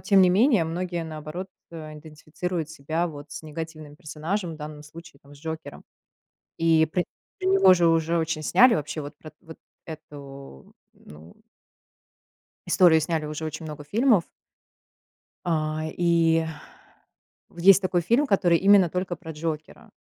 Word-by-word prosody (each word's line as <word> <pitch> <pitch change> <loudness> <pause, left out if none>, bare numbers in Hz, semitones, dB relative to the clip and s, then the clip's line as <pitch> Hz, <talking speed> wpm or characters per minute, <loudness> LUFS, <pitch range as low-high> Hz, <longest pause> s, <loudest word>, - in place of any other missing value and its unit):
тем 195 -3 +4
не 180 - +5
менее, 210 - +4
многие, 175 0 -3
наоборот, 155 +4 -7 0.2
э, 155 -2 -9
идентифицируют 155 +2 -5
себя 160 +3 -2
вот 145 -2 -10
с - - -8
негативным 155 -1 -8
персонажем, 160 +4 -4
в - - -11
данном 150 0 -8
случае, 160 -1 -14
там, 140 +1 -16
с - - -17
Джокером. 160 +1 -7 0.8
И 165 -1 +4
про 175 +3 -1 0.4
про 370 - -1
него 380 - +6
же 170 -2 +3
уже 165 +1 +2
очень 160 -1 -2
сняли, 245 - +5
вообще 155 0 -4
вот 145 +1 -9
про 155 - -12
вот 160 -2 -12 0.3
эту, 140 - -11 0.2
ну 80 +3 -16 1.3
историю 170 -4 +5
сняли 160 -1 -2
уже 155 +1 -5
очень 160 +1 -6
много 150 -1 -8
фильмов. 220 - +2 1.2
А 155 -1 -1
и 165 -1 +3 1.1
Вот 170 - -11
есть 195 +2 +6
такой 180 -1 +1
фильм, 235 - +2
который 175 -6 +3
именно 195 -1 +5
только 180 -1 -3
про 160 -2 -9
Джокера. 155 0 -6
160 Hz, 145 wpm, -25 LUFS, 155-180 Hz, 1.3 s, него